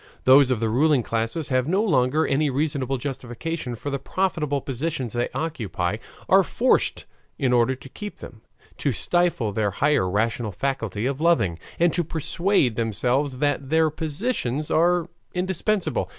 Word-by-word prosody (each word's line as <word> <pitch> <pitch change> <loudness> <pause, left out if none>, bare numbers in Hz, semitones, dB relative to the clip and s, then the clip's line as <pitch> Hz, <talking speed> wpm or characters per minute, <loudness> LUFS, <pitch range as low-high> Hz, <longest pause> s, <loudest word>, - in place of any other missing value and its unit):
Those 130 +1 +6
of 125 -4 +1
the 115 - 0
ruling 135 +3 +3
classes, 115 +8 -2
having 130 +1 +1
no 200 +3 +3
longer 155 - +2
any 145 +2 +1
reasonable 135 -1 -1
justification 130 +1 -4
for 145 +5 -5
the 140 - -2
profitable 150 -4 -1
positions 135 -1 -3
they 120 0 -1
occupy, 105 - -2 0.3
are - - +6
forced, - - +1 0.3
in 130 -2 +1
order 120 +2 +3
to 135 - -12
keep 205 +9 -8
them, 110 - -11 0.4
to 140 - +1
stifle 150 - +1
their 105 0 +1
higher 140 -2 +1
rational 110 +2 -1
faculty 115 -2 -2
of 140 +2 -2
loving, 95 - +2 0.2
and 170 -1 +3
to 175 - +1
persuade 160 - 0
themselves 125 +5 0
that 140 -1 -1
their 160 0 +3
positions 155 - -2
are 175 +1 +3 0.3
indispensable. 180 - -1
140 Hz, 150 wpm, -24 LUFS, 120-160 Hz, 0.4 s, Those